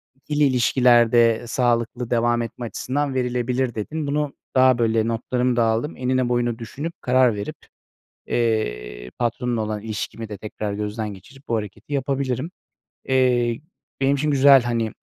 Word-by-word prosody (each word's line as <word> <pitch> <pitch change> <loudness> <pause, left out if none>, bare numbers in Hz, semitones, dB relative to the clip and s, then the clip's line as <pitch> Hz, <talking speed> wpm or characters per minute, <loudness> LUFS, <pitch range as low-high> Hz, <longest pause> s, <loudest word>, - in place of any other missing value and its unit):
2'li 150 +2 -1
ilişkilerde 120 -3 +4
sağlıklı 120 0 0
devam 120 0 +2
etme 115 +1 -5
açısından 140 +4 -2
verilebilir 125 0 -1
dedin. 150 +8 -4
Bunu 145 0 -1 0.2
daha, 130 -1 +5
böyle, 115 -1 +1
notlarımı 125 +2 0
da 120 - +3
aldım, 115 +7 -1
enine 130 -1 0
boyuna 120 -1 0
düşünüp, 145 +8 -6
karar 125 -3 +3
verip, 100 - -5 0.7
eee, - - -2
patronla 120 0 -1
olan 105 -1 -3
ilişkimi 110 +1 -5
de 105 -2 -7
tekrar 105 0 -5
gözden 105 0 -4
geçirip 135 +8 -17
bu 115 - +1
hareketi 105 +6 -7
yapabilirim. 135 +1 -1 0.6
Eee, 125 -2 +2 0.4
benim 135 +1 +3
için 150 +2 0
güzel, 140 -2 +6
hani, 115 -2 -1
120 Hz, 140 wpm, -22 LUFS, 115-130 Hz, 0.7 s, güzel